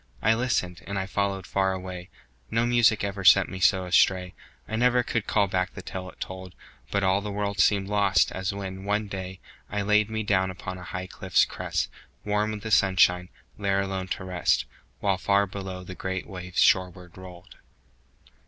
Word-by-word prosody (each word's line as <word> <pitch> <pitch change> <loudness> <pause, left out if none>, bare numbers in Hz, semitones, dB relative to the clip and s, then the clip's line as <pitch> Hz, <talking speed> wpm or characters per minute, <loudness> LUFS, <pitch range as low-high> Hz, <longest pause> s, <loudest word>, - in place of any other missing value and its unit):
I 110 - +5
listened, 110 -7 -1
and 100 - -3
I 95 - -1
followed 100 0 -2
far 95 -1 0
away 90 0 -7 0.4
No 115 +1 +1
music 120 -3 +3
ever 100 -1 -3
sent 95 +1 +6
me 95 - -6
so 95 0 +3
astray, 90 0 +3 0.3
I 110 - -3
never 125 +1 +3
could 115 -2 -2
call 105 -2 +3
back 95 -1 -2
the 100 - -8
tale 90 -1 -6
it - - -17
told, 95 -1 -7 0.3
But 100 -1 0
all 95 +1 +2
the 105 0 -5
world 100 -1 -3
seemed 95 +2 +3
lost, 100 -3 +3
as 95 0 -2
when, 95 -1 -6
one 105 +1 0
day, 95 -1 -6 0.3
I 105 -1 -2
laid 105 +1 +3
me 110 0 -2
down 95 -2 +1
upon 95 0 -7
a - - -9
high 90 0 -5
cliff's 95 0 +1
crest, - - -2 0.4
Warm 105 +1 +1
with 110 -1 -5
the 110 - -5
sunshine, 90 -2 +4 0.3
there 100 -1 +1
alone 95 -1 -3
to - - -9
rest, 90 -2 +1 0.4
While 95 -2 +1
far 100 +1 +3
below 95 -1 -7
the 90 - -8
great 95 +1 -4
waves 90 -1 -9
shoreward 90 -2 +2
rolled. 90 -2 -12
95 Hz, 190 wpm, -26 LUFS, 95-100 Hz, 0.4 s, sent